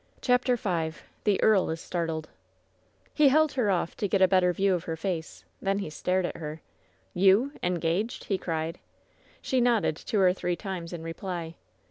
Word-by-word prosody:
CHAPTER 250 0 +2
V 170 -8 -1 0.3
THE 205 -3 +3
EABL 210 -4 +4
IS 165 - -7
STABTLBD 165 -2 -3 0.9
He 300 - +5
held 310 +2 +4
her 250 -5 0
oflf 180 -4 0
to 205 - 0
get 195 - +1
a 190 - +6
better 185 -1 +3
view 195 +2 +2
of 175 -2 -2
her 165 - -3
face. 165 -1 -4 0.2
Thea 195 0 +1
he 195 -6 -4
stared 185 +3 0
at - - -4
her. 155 -1 -6 0.5
"You! 195 +9 +4
Engaged?" 180 +5 -1
he 195 -2 -1
cried. 165 0 -3 0.6
She 260 -1 +1
nodded 235 -9 +2
two 205 +6 -2
or 185 -2 +5
three 180 -1 -2
times 180 -2 -6
in 170 -2 -6
reply. 165 0 -5
185 Hz, 175 wpm, -28 LUFS, 165-205 Hz, 0.9 s, a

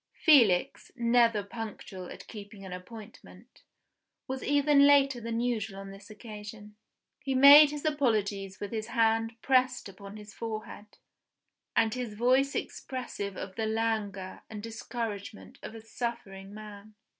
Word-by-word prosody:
Felix, 235 - +3
never 235 -3 +3
punctual 200 -4 -8
at - - -10
keeping 205 -2 -10
an 185 - -7
appointment, 215 +3 -12 0.7
was 265 0 -4
even 285 0 +4
later 275 -3 +4
than 230 0 -3
usual 220 -5 -2
on 195 0 -9
this 195 +1 -13
occasion. 210 -1 -10 0.4
He 270 -1 -3
made 285 +3 +9
his 295 0 -6
apologies 210 -9 0
with 205 - -6
his 220 -1 -4
hand 225 0 +1
pressed 255 -2 +2
upon 200 +1 -11
his 210 -1 -12
forehead, 215 -1 -7 0.8
and 225 -1 +3
his 245 -4 -5
voice 255 +5 +2
expressive 205 -7 -5
of 190 0 -7
the 220 -1 -1
languor 215 -4 -2
and 210 -2 -8
discouragement 220 - -6
of 225 - -8
a 225 - -9
suffering 215 -4 -6
man. 210 0 -11
220 Hz, 135 wpm, -29 LUFS, 205-245 Hz, 0.8 s, made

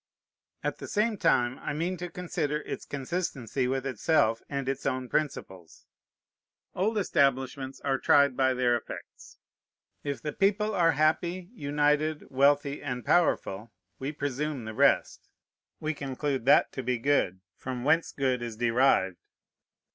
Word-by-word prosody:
At - - -2
the - - -7
same 215 +1 +1
time 125 -9 +2
I - - -4
mean 170 +5 -1
to 175 +1 -5
consider 155 -4 -2
its - - -6
consistency 135 - -2
with 135 +1 -1
itself 115 -3 +2
and 140 -2 -3
its 135 0 -2
own 130 -1 -1
principles. 95 - -4 0.9
Old 215 +4 0
establishments 135 -6 0
are 135 -1 0
tried 140 -2 +4
by 130 0 +2
their 125 -1 +2
effects. 120 - -9 0.7
If 140 -2 -3
the 150 - -3
people 210 +2 +1
are 165 -3 +3
happy, 170 +5 0
united, 150 - 0
wealthy, 140 +1 +2
and 125 -4 -4
powerful, 115 - +1 0.3
we 135 +2 -3
presume 145 -2 -3
the 110 - -6
rest. - - +2 0.5
We 155 0 -2
conclude 135 -2 -3
that 140 - +5
to 130 - -4
be 125 0 -1
good 115 -8 +1
from 125 -2 -5
whence 160 +4 +2
good 130 -3 0
is 115 -2 -5
derived. 115 -6 +2
140 Hz, 140 wpm, -28 LUFS, 125-155 Hz, 0.9 s, that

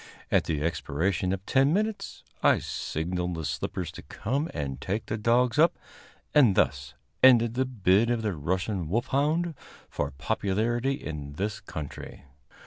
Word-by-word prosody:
At - - +3
the 75 -3 -1
expiration 85 +3 -1
of 95 0 -3
ten 135 +3 +3
minutes, 215 +2 -2 0.2
I - - +5
signaled 90 +2 -3
the 80 -2 -4
slippers 75 +5 -3
to - - -10
come 140 +8 -3
and 70 -3 -4
take 100 +7 -2
the 110 - -3
dogs 120 +3 +2
up; 165 +2 +5 0.6
and 125 -10 +6
thus 70 -4 0 0.3
ended 120 -3 +6
the 130 +2 +1
bid 110 -2 +2
of 120 -2 0
the 105 -3 0
Russian 90 +3 -2
wolfhound 150 - +1 0.4
for 75 - -2
popularity 110 - -1
in 75 - -6
this 100 +6 -3
country. 75 -3 -8
100 Hz, 145 wpm, -27 LUFS, 80-125 Hz, 0.6 s, and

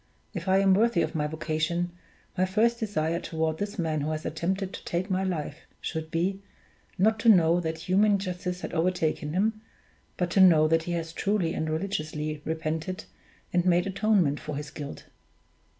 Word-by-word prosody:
If 175 -2 -5
I 190 0 +4
am 195 -1 +5
worthy 215 -2 +3
of - - -3
my 150 -2 0
vocation, 160 +3 -1 0.4
my 185 - +2
first 220 +5 +2
desire 170 -7 -1
toward 160 -2 -2
this 205 +1 -3
man 160 -4 0
who 150 - -1
has 155 0 -3
attempted 185 +4 -2
to - - -8
take 185 +3 -2
my 190 +1 +1
life 160 -4 -4
should 160 -1 -4
be, 185 +4 -1 0.6
not 220 +3 +3
to 230 - +4
know 170 -4 +6
that 160 -1 -3
human 200 +2 +4
justice 180 -1 -4
has - - -5
overtaken 160 -3 0
him, 215 +4 +1 0.6
but 175 -1 -1
to 195 - +4
know 160 -4 +7
that 165 +1 +3
he 175 - -2
has 165 -1 -3
truly 195 -3 0
and 160 - -2
religiously 155 -3 -3
repented 160 +4 -3 0.5
and 175 -1 +3
made 175 -1 +3
atonement 195 -7 +2
for 150 -1 -5
his 150 +1 -6
guilt. 145 -3 -7
175 Hz, 180 wpm, -27 LUFS, 160-190 Hz, 0.6 s, know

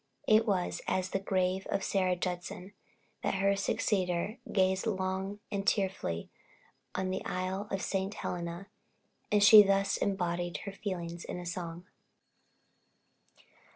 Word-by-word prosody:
It 220 +2 +5
was 185 -4 0
as 185 0 0
the 195 - 0
grave 190 -1 0
of 195 - -1
Sarah 185 -2 +1
Judson, 180 +2 -4 0.5
that - - 0
her 195 +1 +3
successor 195 0 0
gazed 190 +2 +2
long 190 0 -2
and 200 0 -2
tearfully 190 - 0 0.6
on 185 0 -1
the 190 - -3
Isle 185 +3 -3
of 195 - -2
St. 195 +1 -1
Helena; 170 +1 -4 0.7
and 210 -1 +4
she 210 +1 +11
thus 195 0 +2
embodied 175 -3 -1
her 200 - -4
feelings 175 -4 -5
in 180 0 -6
song. 170 0 -5
190 Hz, 125 wpm, -31 LUFS, 180-195 Hz, 0.7 s, she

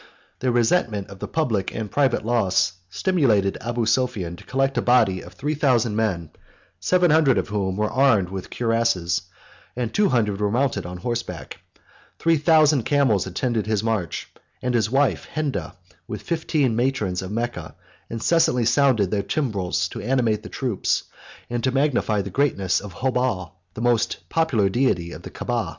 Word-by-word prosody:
The 130 -1 +1
resentment 115 - +1
of 100 - -11
the - - -5
public 115 -12 -1
and 110 -3 -4
private 135 -6 +1
loss 100 -6 +2 0.2
stimulated 110 - +1
Abu 120 0 -1
Sophian 110 -7 0
to - - -13
collect 135 +1 0
a - - +1
body 110 -7 +3
of 90 - -12
three 145 +11 -2
thousand 125 -7 +2
men, 90 -8 -1 0.5
seven 175 - +3
hundred 150 -5 +4
of - - -1
whom 100 -3 -1
were 105 0 0
armed 130 -9 +3
with 95 -1 -6
cuirasses, 115 -8 0 0.5
and 120 -2 -3
two 205 -2 +3
hundred 105 -6 +1
were 105 - +2
mounted 115 -5 0
on 90 0 -7
horseback; 90 - -5 0.6
three 165 -1 +2
thousand 155 -2 +4
camels 120 -8 +2
attended 110 +3 -1
his 110 -1 0
march; 110 -7 -2 0.3
and 125 0 -2
his 110 -3 +2
wife 115 - +1
Henda, 145 -11 -2 0.3
with 105 - -6
fifteen 155 -7 0
matrons 115 -7 0
of 95 - -6
Mecca, 115 -7 -4 0.3
incessantly 125 +1 +2
sounded 120 -5 +3
their 105 -2 +1
timbrels 100 - -1
to - - -7
animate 115 -2 +1
the - - -9
troops, 125 -8 -1 0.4
and 120 -1 -3
to 130 - +2
magnify 130 -6 +1
the 100 - -7
greatness 100 -10 +1
of 105 -1 -9
Hobal, 125 -4 -1 0.2
the - - -5
most 120 -2 0
popular 140 -12 +2
deity 95 -6 0
of - - -9
the - - -9
Caaba. - - -2
115 Hz, 165 wpm, -23 LUFS, 100-135 Hz, 0.6 s, hundred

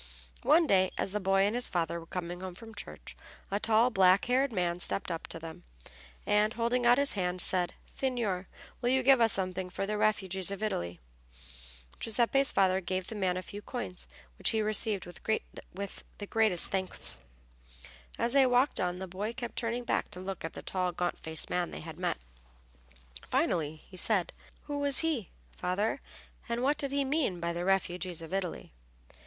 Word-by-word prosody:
One 325 +2 +5
day, 190 -8 +4
as - - -1
the 210 - -1
boy 195 0 +3
and 205 - +1
his 245 +1 +1
father 170 -1 -1
were 165 - -12
coming 175 0 -5
home 185 -2 -6
from 225 +3 -11
church 205 - -8 0.4
a 200 - +1
tall, 225 +3 +4
black 190 -2 +5
haired 260 +2 +2
man 175 -4 0
stepped 185 +1 -1
up 165 - -4
to - - -6
them, 165 0 -9 0.6
and, 210 +2 +3
holding 240 +1 +1
out 245 +1 +7
his 280 0 +4
hand, 180 -2 -1
said, 180 -1 +2
"Signor, 225 -9 -2 0.3
will 245 - +1
you 260 0 +3
give 265 -1 +6
us 225 -1 +8
something 185 -1 +2
for 195 - -3
the 210 +1 -2
refugees 190 -3 +2
of 200 +1 -4
Italy?" 85 - -2 1.0
Giuseppe's 240 +5 +3
father 190 -1 +3
gave 185 +1 -2
the 225 - -5
man 185 -3 0
a 185 - -4
few 205 +2 -8
coins, 90 - -5 0.3
which - - +3
he 220 - +1
received 215 -2 +1
with 175 - -10 1.0
the 205 - -5
greatest 215 -4 +2
thanks. 185 - -2 1.0
As 235 - +1
they 275 -2 +6
walked 250 +3 +3
on 180 0 0
the 190 +1 -5
boy 200 +5 -3
kept 240 -1 -6
turning 235 +1 -2
back 235 - 0
to 180 - -8
look 190 0 -5
at 165 - -4
the - - -8
tall 185 -1 -1
gaunt 175 0 -2
faced 160 0 -1
man 175 -1 0
they - - -7
had 160 +1 -9
met. 180 - 0 1.1
Finally 155 -2 0
he 185 - -8
said, 190 -1 +1 0.3
"Who 290 -1 -4
was 285 -2 +3
he, 305 - -1 0.3
father, 200 +8 -1 0.5
and 235 +1 -1
what 285 +3 +2
did 280 -1 0
he 280 0 +1
mean 270 - 0
by 170 0 -1
the 175 +1 -3
refugees 180 -3 0
of 165 - -8
Italy?" 190 - -3
195 Hz, 185 wpm, -31 LUFS, 180-235 Hz, 1.1 s, us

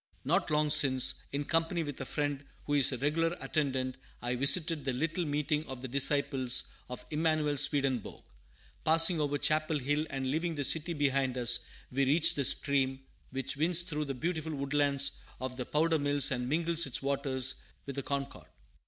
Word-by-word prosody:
Not - - 0
long 150 0 +1
since, 135 -3 +4 0.2
in 145 +1 -3
company 165 +1 0
with 145 -3 -7
a - - -4
friend 145 0 -3 0.2
who 145 - -3
is 140 -3 +4
a 130 - -3
regular 165 +5 -1
attendant, 130 -4 -2 0.2
I 120 +1 -3
visited 150 +4 +5
the 135 -1 -2
little 165 +7 -2
meeting 150 +1 -1
of 130 -1 -8
the - - -4
disciples 135 -1 +2 0.2
of 125 - -8
Emanuel 155 -1 0
Swedenborg. 135 -4 +1 0.6
Passing 165 +1 +5
over 145 -1 -1
Chapel 155 +1 0
Hill 145 +3 -1
and 135 -1 -3
leaving 165 +2 -2
the 145 - -3
city 160 +5 +2
behind 135 -3 0
us, 120 -1 +2 0.2
we 135 +2 0
reached 165 +5 +3
the 140 - 0
stream 135 -1 +1 0.3
which 135 +2 -4
winds 170 +3 +1
through 150 -3 -4
the 135 -1 -5
beautiful 160 +2 -4
woodlands 140 0 +1 0.2
at 130 -1 -5
the 125 -1 -6
Powder 160 +1 +1
Mills 145 0 +3
and 125 -1 -2
mingles 165 +1 0
its 135 - -1
waters 135 -2 -1 0.2
with 140 - -7
the 140 - -3
Concord. 140 0 -5
145 Hz, 175 wpm, -30 LUFS, 135-155 Hz, 0.6 s, visited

